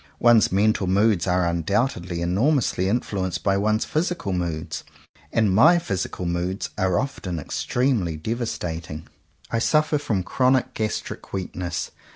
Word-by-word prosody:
One's 120 -2 +5
mental 100 0 +2
moods 100 -1 +2
are 90 -1 +2
undoubtedly 90 - -1
enormously 100 - +1
influenced 95 -5 -2
by 100 -1 +2
one's 110 +2 +1
physical 160 - -1
moods; 85 -2 -3 0.5
and 110 -4 +2
my 160 - +6
physical 95 - -3
moods 90 +3 -2
are 95 -1 +1
often 105 -8 -3
extremely 100 - -1
devastating. 85 -6 -4 0.4
I 115 - +1
suffer 150 +4 +2
from 105 -9 -1
chronic 130 +5 +1
gastric 110 -1 -4
weakness. 90 -2 -4
95 Hz, 125 wpm, -24 LUFS, 90-115 Hz, 0.5 s, my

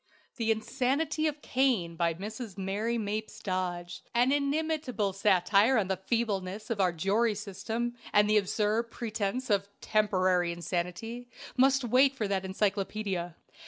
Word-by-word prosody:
"The 225 -2 -1
Insanity 275 +8 0
of 295 -1 -4
Cain," 240 -11 +1
by 170 -1 +1
Mrs. 215 +2 -7
Mary 205 +5 -1
Mapes 215 0 -3
Dodge, 180 -3 -3
an 245 +3 +4
inimitable 285 -7 0
satire 200 +5 +4
on 195 -4 +1
the 190 - +2
feebleness 210 -3 -1
of 210 -3 0
our 185 -2 +3
jury 205 +7 +1
system 225 +4 -3 0.2
and 210 0 +5
the 215 0 +4
absurd 215 +3 0
pretence 225 +1 -3
of 200 0 +1
"temporary 185 -4 +2
insanity," 180 +8 -4 0.3
must 270 +1 +4
wait 260 +3 +4
for 220 -6 -1
that 195 -1 0
encyclopædia. 195 -2 -2
210 Hz, 135 wpm, -30 LUFS, 190-240 Hz, 0.3 s, and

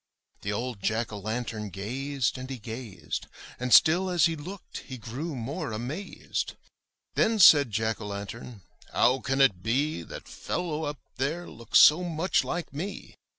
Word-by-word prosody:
The 105 - -2
old 115 0 -3
Jack 110 +3 0
o' 105 - -5
lantern 110 0 -3
gazed 130 +7 -2
and 130 +1 -7
he 135 - -4
gazed, 105 -8 -6 0.3
And 125 0 -2
still 175 +8 +6
as 175 -5 +4
he 165 - +1
looked 175 +5 -8
he 130 - -8
grew 135 +8 -5
more 125 0 -4
amazed., 130 - -4 0.6
Then 225 0 +2
said 145 - +8
Jack 110 +2 -1
o' 105 - -5
lantern, 100 +1 -7 0.3
*'How 125 +3 +3
can 135 +2 0
it 100 -10 +4
be 125 - 0
That - - -9
fellow 160 -3 -3
up 145 0 -4 0.2
there 155 +7 -2
looks 115 -1 0
so 160 +4 +8
much 175 +2 +1
like 175 -4 -4
me? 180 +8 -6
130 Hz, 160 wpm, -28 LUFS, 110-155 Hz, 0.6 s, said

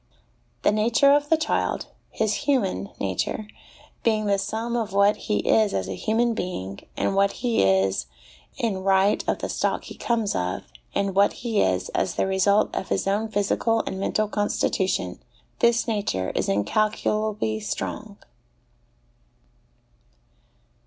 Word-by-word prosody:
The - - +4
nature 230 +6 +4
of 290 0 +2
the 320 - +5
child 310 -1 -1 0.2
his 215 -1 0 0.2
human 195 - +1
nature 100 - -2 0.5
being 215 -2 +1
the 200 -1 +2
sum 225 +4 -3
of 225 -5 -2
what 200 +1 +4
he 210 - -2
is 215 -2 +3
as 95 -1 -1
a 95 - -3
human 230 - +1
being, 100 - -4 0.2
and - - 0
what 200 0 +3
he 235 -2 +2
is 95 -6 +2 0.5
in 220 -5 -1
right 195 +1 +3
of - - +1
the - - -4
stock - - -1
he - - -9
comes 225 -4 0
of, 90 0 -2 0.3
and 195 -1 0
what 200 +2 +4
he 225 -3 +2
is 95 -1 +1
as - - -1
the - - +1
result 195 +2 +2
of 190 - -3
his - - 0
own 205 +3 0
physical 220 +2 +1
and 190 - -4
mental 215 +2 0
constitution 190 - -1 0.4
this 235 0 +3
nature 200 - -1
is - - -1
incalculably 210 - 0
strong. 110 -1 -5
205 Hz, 145 wpm, -24 LUFS, 180-220 Hz, 0.5 s, the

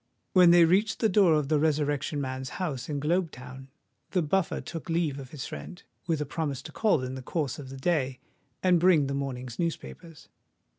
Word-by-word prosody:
When 180 -2 +7
they 170 -1 +7
reached 195 +6 +2
the 220 - +3
door 185 -5 +5
of 150 -2 0
the 155 0 +2
Resurrection 145 -1 0
Man's 130 -1 -4
house 155 -9 -3
in 145 -1 -2
Globe 170 +4 +1
Town, 130 0 -11 0.5
the 180 -3 +2
Buffer 185 +4 0
took 165 -1 -7
leave 165 -4 0
of 130 -2 -9
his 145 -2 -6
friend, 180 - -8 0.2
with 165 -3 +1
a 150 - -1
promise 140 -2 -3
to - - -9
call 210 - +2
in 130 0 -4
the 130 - -6
course 145 0 -3
of 135 -3 -8
the 135 - -8
day 135 -3 0 0.4
and 180 -2 +4
bring 170 -4 +5
the 140 - -3
morning's 130 -3 -4
newspapers. 165 -1 -5
150 Hz, 200 wpm, -28 LUFS, 135-175 Hz, 0.5 s, When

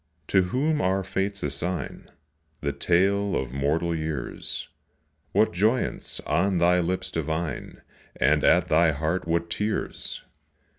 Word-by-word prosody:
to 95 - +4
whom 145 - +1
our 95 +1 +1
Fates 100 +1 -2
assign 80 +5 -4 0.5
The 70 -1 -1
tale 95 +6 +2
of 65 -2 -2
mortal 75 +5 0
years, 80 -4 -4 0.6
What 110 - +3
joyance 110 +8 0
on 90 +5 +2
thy 90 +1 +4
lips 90 +2 -1
divine 80 -3 -3 0.3
And - - +3
at - - +5
thy 80 0 +4
heart 80 +5 -1
what 85 0 0
tears! 105 +3 -2
85 Hz, 120 wpm, -26 LUFS, 80-95 Hz, 0.6 s, at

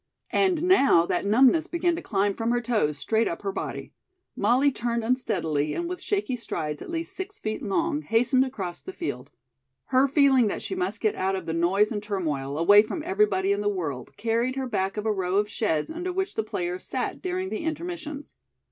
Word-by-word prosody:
And 365 -4 +2
now 275 - +5
that 180 +3 -1
numbness 260 +9 +4
began 345 0 0
to - - -5
climb 200 -1 0
from 225 +3 -2
her 240 0 +2
toes 215 -11 0
straight 220 +10 +1
up 170 - -4
her 195 - -1
body. - - -5 0.4
Molly 270 +4 +3
turned 235 -2 -2
unsteadily 190 - 0
and 345 - -2
with 360 +1 -5
shaky 395 -10 -1
strides 160 -10 -4
at - - -8
least 335 +2 -3
six 390 +2 -5
feet 215 0 -4
long, 300 - 0
hastened 245 +1 +3
across 195 -10 -5
the 375 - -8
field. 345 - -5 0.6
Her 260 +2 +5
feeling 270 -4 +4
that - - -3
she - - -4
must 185 +4 -3
get 215 -2 +2
out 190 +1 -1
of 190 -3 -5
the 165 - -3
noise 190 +6 +2
and 210 -2 -2
turmoil, 150 -9 -3
away 205 +6 +7
from 300 +9 -5
everybody 360 - +2
in 200 0 +1
the 205 - +1
world, 150 -11 -4
carried 230 +4 0
her 265 -1 -2
back 195 -5 -2
of 210 - -3
a 220 - +2
row 190 -1 -1
of 205 0 +2
sheds 205 - -1
under 350 +3 -3
which 380 +1 -2
the - - 0
players 180 -3 -3
sat - - -3
during 370 0 -2
the 360 - -4
intermissions. 315 -2 -5
225 Hz, 205 wpm, -26 LUFS, 190-310 Hz, 0.6 s, away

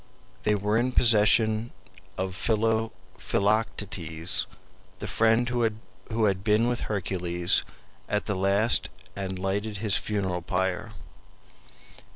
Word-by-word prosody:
They 105 -1 +3
were 105 +2 0
in 125 +1 0
possession 110 0 +4 0.4
of 95 0 -2
Philoctetes, 105 -5 -1 0.5
the - - -7
friend 115 +2 +2
who 115 -1 -3
had 95 -2 +1
been 110 +2 +3
with 120 -1 -1
Hercules 90 -4 0 0.5
at 105 - -1
the 105 - -1
last 100 +4 +3 0.3
and 95 -1 -4
lighted 100 +3 -2
his 105 -1 +1
funeral 95 -4 -2
pyre. 95 +5 -2
105 Hz, 105 wpm, -26 LUFS, 95-110 Hz, 0.5 s, possession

